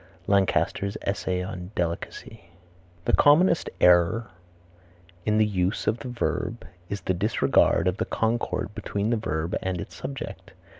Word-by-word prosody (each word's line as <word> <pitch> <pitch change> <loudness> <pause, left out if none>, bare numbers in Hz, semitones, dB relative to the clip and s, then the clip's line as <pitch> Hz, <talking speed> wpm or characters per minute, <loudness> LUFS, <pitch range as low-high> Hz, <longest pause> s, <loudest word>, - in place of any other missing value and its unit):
Lancaster's 100 0 +1
Essay 95 -2 -1
on 90 -1 -6
Delicacy. 85 +3 -4 0.6
The - - +1
commonest 165 +4 +5
error 90 +6 +4 1.0
in 105 0 +3
the 110 - +5
use 95 -2 -1
of 115 - +1
the 115 - -7
verb 120 -2 -2 0.2
is 100 - -4
the 95 - 0
disregard 90 -2 +2
of 90 +1 0
the - - -1
concord 115 -2 -1
between 105 +2 -2
the 120 - +2
verb 80 -5 -2
and 95 -2 -2
its - - -7
subject. 70 - -7
100 Hz, 140 wpm, -26 LUFS, 90-110 Hz, 1.0 s, commonest